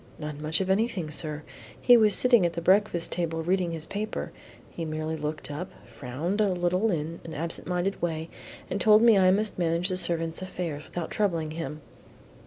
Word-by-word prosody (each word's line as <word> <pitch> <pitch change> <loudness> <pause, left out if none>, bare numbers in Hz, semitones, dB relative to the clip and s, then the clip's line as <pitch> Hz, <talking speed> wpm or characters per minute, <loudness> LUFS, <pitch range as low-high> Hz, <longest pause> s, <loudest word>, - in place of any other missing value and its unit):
"Not 150 -1 -6
much 155 +4 -1
of 190 - -2
anything, 195 -6 0
sir. 150 -1 -3 0.4
He 245 - +6
was 215 -4 +5
sitting 240 -5 +5
at 170 -1 +1
the 170 - -3
breakfast 185 -1 +2
table 165 -2 -2
reading 180 0 0
his 160 -1 -3
paper, 210 +5 -4 0.4
he 170 - -6
merely 155 0 -3
looked 150 -1 -5
up, 170 +6 -5 0.2
frowned 155 - -3
a 210 - +3
little 180 +4 +1
in 165 -2 -3
an 165 - -8
absent 165 +2 -3
minded 180 +2 -1
way, 160 -2 -2 0.4
and - - -3
told 215 +1 +6
me 230 -2 +7
I 185 -2 +5
must 205 +1 +1
manage 170 +2 +1
the 185 - -1
servants' 165 -1 0
affairs 175 -5 -5
without 175 -2 -5
troubling 170 -7 -1
him." 155 -2 -6
170 Hz, 190 wpm, -27 LUFS, 160-190 Hz, 0.4 s, me